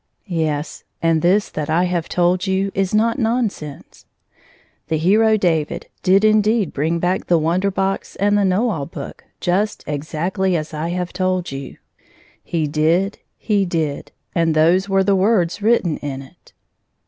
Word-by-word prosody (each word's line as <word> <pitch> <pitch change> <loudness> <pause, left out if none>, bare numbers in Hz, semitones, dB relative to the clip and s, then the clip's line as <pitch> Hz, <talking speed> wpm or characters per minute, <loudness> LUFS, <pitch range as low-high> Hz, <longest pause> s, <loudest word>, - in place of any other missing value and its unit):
Yes; 160 -5 -2 0.2
and 165 -1 +2
this 195 +5 +3
that 150 -1 -4
I 165 +3 +2
have 175 -2 -1
told 180 +2 +1
you 190 +1 0
is 195 -1 0
not 230 +4 +2
non 230 -1 +1
sense. 150 -5 -11 0.8
The 160 - 0
hero 215 +7 +4
David 165 -6 -1
did 195 +3 +4
indeed 215 -2 +2
bring 160 +4 0
back 180 +2 -1
the 175 - +4
Wonder 170 +5 +1
Box 195 0 -2
and 205 +1 +2
the 205 - +3
Know 200 +5 +2
All 145 -7 -3
Book - - -9 0.2
just 200 +4 0
exactly 170 +5 -1
as 155 0 -5
I 155 +2 -3
have 180 0 -3
told 185 -2 -1
you 135 0 -7 0.4
— - - -31
he 160 -2 +1
did 165 +7 +1
— - - -52
he 200 -1 +4
did 160 -5 -2
— - - -46
and 165 -2 +1
those 175 +5 +3
were 195 0 +3
the 200 0 +3
words 190 -1 +1
written 205 -7 +2
in 135 -2 -5
it. 135 - -20
180 Hz, 170 wpm, -20 LUFS, 160-200 Hz, 0.8 s, hero